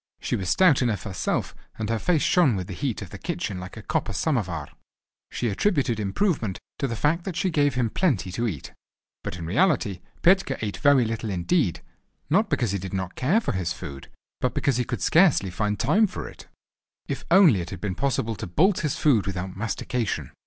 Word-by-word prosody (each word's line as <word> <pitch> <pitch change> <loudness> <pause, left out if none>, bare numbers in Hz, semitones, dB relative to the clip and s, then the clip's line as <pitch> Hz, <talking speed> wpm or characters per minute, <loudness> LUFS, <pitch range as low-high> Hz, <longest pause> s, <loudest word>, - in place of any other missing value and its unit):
She - - -2
was 95 -3 -3
stout 180 -8 +5
enough 115 -5 0
herself 95 -5 -2 0.2
and 110 - -3
her 115 - 0
face 165 +1 +1
shone 170 - +4
with 95 -2 -3
the 95 - -7
heat 115 +2 -3
of 90 - -11
the 100 - -8
kitchen 160 - -3
like 90 +4 -9
a 110 - -8
copper 115 - -1
samovar. 95 - -1 0.6
She 120 - -2
attributed 125 - +1
his - - -1
improvement 110 - 0 0.2
to 140 - 0
the 115 - -3
fact 160 +8 +1
that 190 -3 -5
she 185 +1 0
gave 145 -4 +2
him 120 -3 0
plenty 145 - 0
to 115 +6 -1
eat. 80 -11 -6 0.5
But 90 - -5
in 85 - -6
reality 115 - +1 0.2
Petka 190 +2 +4
ate 105 -2 -3
very 145 -4 +4
little 115 0 -3
indeed, 95 - 0 0.5
not 205 +5 +3
because 115 -6 0
he 100 - -1
did 95 +1 -5
not 95 -1 -3
care 165 - +2
for 230 - -2
his 90 -3 -2
food, 70 -1 -8 0.3
but - - -1
because 135 -4 +1
he 125 - 0
could 120 0 -4
scarcely 160 - +4
find 105 +2 -1
time 200 - +3
for - - -6
it. - - -13 0.6
If - - -4
only 170 - +6
it 85 - -6
had 95 - -7
been 100 0 -2
possible 115 -1 -1
to - - -5
bolt 175 - +3
his 150 -4 -1
food 125 -11 +3
without 95 -1 -4
mastication! 110 - -3
115 Hz, 210 wpm, -25 LUFS, 95-155 Hz, 0.6 s, only